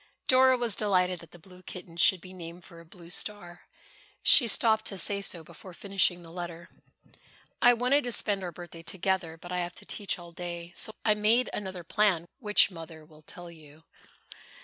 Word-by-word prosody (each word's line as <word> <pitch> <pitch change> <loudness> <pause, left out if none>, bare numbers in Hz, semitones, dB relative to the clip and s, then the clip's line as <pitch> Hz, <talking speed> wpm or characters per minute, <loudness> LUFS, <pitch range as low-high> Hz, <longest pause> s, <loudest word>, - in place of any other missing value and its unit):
Dora 260 0 +5
was 235 -4 -1
delighted 185 -4 +1
that 170 - -14
the 175 - -14
blue 180 +2 -16
kitten 180 -2 -10
should 175 +1 +4
be 185 0 -12
named 175 -1 -10
for 170 -2 -13
a 170 - -14
blue 170 0 -14
star. 175 -3 -2 0.6
She 245 - +8
stopped 220 0 +3
to 195 - -4
say 200 +3 0
so 175 -4 -4
before 170 +3 -13
finishing 190 -3 +1
the 165 - -13
letter. 170 -1 -7 0.9
"I 245 - +7
wanted 250 +4 +1
to 245 - -3
spend 205 -4 0
our 175 - -4
birthday 170 0 -11
together, 185 -2 -2
but 175 +2 -11
I 180 - -1
have 175 0 -4
to - - -11
teach 205 -2 -1
all 175 -1 -11
day. 170 0 -7
So - - 0
I 215 - +5
made 215 +4 +2
another 190 -3 -5
plan 190 -2 +1
which 210 -4 +4
Mother 160 -2 -11
will 155 0 -19
tell 175 +2 -10
you." 155 -1 -16
180 Hz, 195 wpm, -28 LUFS, 170-205 Hz, 0.9 s, She